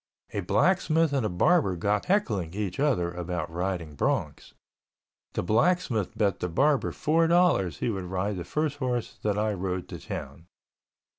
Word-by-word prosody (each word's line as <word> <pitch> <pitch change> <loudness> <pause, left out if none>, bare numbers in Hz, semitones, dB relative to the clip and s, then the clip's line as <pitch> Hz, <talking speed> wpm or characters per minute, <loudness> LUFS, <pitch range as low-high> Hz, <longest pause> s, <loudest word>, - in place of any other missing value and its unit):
A - - -1
blacksmith 165 -4 +2
and 135 -3 +1
a 110 - 0
barber 95 - +3
got 100 +4 0
heckling 105 - 0
each 100 -1 -3
other 110 -13 +1
about 90 -2 -4
riding 85 -2 -3
broncs. - - -2 0.8
The - - -1
blacksmith 115 - +1
bet 100 -3 +1
the 90 - -2
barber 140 - +2
four 165 +2 +2
dollars 165 - +3
he 120 - -1
would 95 -3 -4
ride 95 +2 -2
the 90 - -4
first 150 - -2
horse 125 -4 -3
that 105 -1 0
I 105 0 +1
rode 95 -1 -3
to - - -7
town. 70 +5 -7
105 Hz, 160 wpm, -27 LUFS, 90-145 Hz, 0.8 s, barber